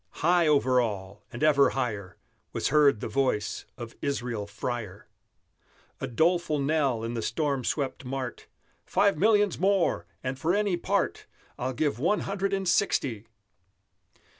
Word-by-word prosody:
High 175 -1 +4
over 130 -4 +4
all, 100 -3 -4
and 120 - -5
ever 145 -2 +5
higher, 105 -8 -3 0.4
Was - - -1
heard 140 -5 +4
the - - -3
voice 130 -6 -1
of 120 -1 -8
Israel 120 -7 -2
Freyer, 110 -1 -5 0.9
A 135 - -3
doleful 160 +4 +1
knell 140 -5 +1
in 115 +1 -3
the 115 - -2
storm 135 +3 -1
swept 140 +2 -2
mart, 130 -1 -5 0.4
"Five 200 -1 +2
millions 205 -2 +3
more! 185 - +1 0.2
and 130 +1 -3
for 170 +5 +1
any 205 -3 +1
part 175 - -1 0.3
I'll 130 +1 -2
give 140 -2 -1
One 200 +9 +1
Hundred 195 0 -2
and 195 -1 -1
Sixty!" 125 - +1
135 Hz, 140 wpm, -27 LUFS, 120-170 Hz, 0.9 s, ever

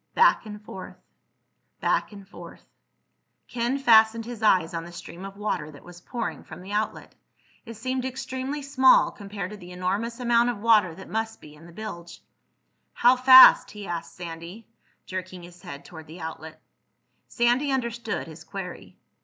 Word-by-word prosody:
Back 470 - +4
and 210 0 -8
forth... 190 -3 -10 0.8
back - - 0
and 200 -2 -12
forth.... - - -13 0.8
Ken 240 +3 -1
fastened 225 -3 +4
his 240 -1 -8
eyes 185 -6 +3
on 165 0 -3
the 170 - -11
stream 175 +1 -10
of 195 0 -10
water 185 -7 -3
that 145 -2 -14
was 175 0 -13
pouring 235 +4 -5
from - - -11
the 195 - -9
outlet. 210 +1 -3 0.5
It 230 - -8
seemed 255 +3 -3
extremely 260 +2 -5
small 265 -1 +4
compared 200 -2 -7
to 210 - -8
the 180 -2 -12
enormous 200 +7 -3
amount 240 -1 +3
of 240 - -3
water 210 -6 +3
that 190 - -11
must 225 0 -3
be 150 - -14
in 155 +3 -15
the - - -14
bilge. 170 -3 -8 0.7
"How 245 +2 +5
fast?" 255 0 +8
he 210 -1 -9
asked 170 -2 -6
Sandy, 170 +5 -9 0.4
jerking 185 -1 -7
his 175 0 -14
head 145 -7 -10
toward 160 -2 -12
the 165 +4 -11
outlet. 160 0 -8 0.7
Sandy 245 +4 +1
understood 235 -4 -3
his 160 0 -12
query. 170 - -8
210 Hz, 165 wpm, -25 LUFS, 175-235 Hz, 0.8 s, fast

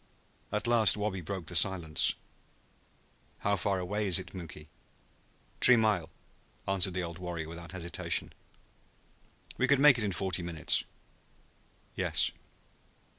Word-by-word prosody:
At 105 +2 -2
last 115 -5 +4
Wabi 105 -3 -3
broke 95 0 -6
the 90 - -7
silence. 85 -3 +3 1.3
"How 100 0 +1
far 100 +1 -1
away 100 +3 -2
is 90 - +3
it, - - -5
Muky?" 80 -4 -10 0.9
"T'ree 125 -1 +8
mile," 105 -6 0 0.6
answered 95 -2 +1
the 90 - -2
old 85 0 -7
warrior 85 -3 -5
without 85 0 -9
hesitation. 85 -2 -3 1.3
"We 125 - +2
could 140 -1 +3
make 140 -3 +6
it - - +1
in 100 - -1
forty 90 0 -2
minutes." 85 -2 -1 1.1
"Yes." - - +1
95 Hz, 125 wpm, -30 LUFS, 85-105 Hz, 1.3 s, T'ree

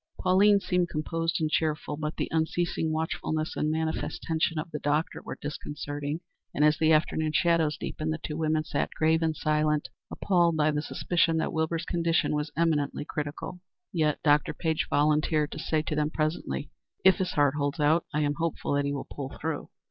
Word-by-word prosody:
Pauline 200 +2 +5
seemed 180 -2 0
composed 165 +2 -1
and 160 - +1
cheerful, 150 -1 0
but 150 +1 -4
the - - -1
unceasing 160 0 0
watchfulness 155 0 -2
and 150 - 0
manifest 160 0 -2
tension 160 0 0
of 160 +2 -4
the 150 - -4
doctor 150 +3 0
were - - -7
disconcerting, 145 +1 -4 0.3
and 150 - +4
as 150 0 +3
the 160 0 +4
afternoon 155 0 +2
shadows 160 -2 +2
deepened, 155 0 -3
the 155 - -1
two 150 -1 -5
women 155 -1 +1
sat - - -1
grave 160 +1 +3
and 160 -1 +1
silent, 150 -1 +1 0.2
appalled 175 -4 +2
by 155 0 +3
the 150 0 -1
suspicion 165 +1 +1
that 160 - -1
Wilbur's 160 +1 -1
condition 170 -2 +1
was 150 0 -1
eminently 150 -4 +1
critical. 150 +5 -5 0.3
Yet 155 -4 +2
Dr. 150 0 +3
Page 160 -2 -1
volunteered 150 +1 +2
to - - -6
say 155 -1 0
to 155 - -3
them 150 0 +1
presently: 155 -2 -2 0.3
"If 190 - +7
his 185 -1 -1
heart 145 -2 +3
holds 145 -1 -2
out, 155 +3 +3
I 150 - 0
am 145 -1 +1
hopeful 165 -3 -1
that 140 0 +1
he 140 - -1
will 140 - -4
pull 140 -1 -7
through." 160 -1 -3
155 Hz, 185 wpm, -28 LUFS, 150-165 Hz, 0.3 s, If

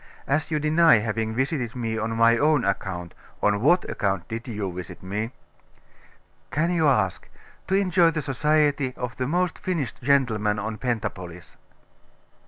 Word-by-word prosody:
As 150 +3 0
you 155 - 0
deny 155 -1 +5
having 110 +1 -2
visited 130 -2 -1
me 115 -2 -2
on 110 +1 -2
my 115 0 +5
own 150 +1 +2
account, 95 -3 -3 0.3
on 105 0 +2
what 175 +8 +3
account 95 -3 -2
did 115 +2 -6
you 105 -5 -4
visit 90 0 -8
me?' 105 +4 -3 1.2
'Can 165 +4 0
you 165 -3 +2
ask? 105 -10 +1 0.4
To 190 - +1
enjoy 180 -3 +4
the 155 -2 -3
society 145 -1 +1
of 125 0 -4
the 125 - -1
most 175 +1 0
finished 165 -9 -3
gentleman 115 -6 +2
of 110 +1 -4
Pentapolis. 95 -8 -4
120 Hz, 150 wpm, -25 LUFS, 105-150 Hz, 1.2 s, deny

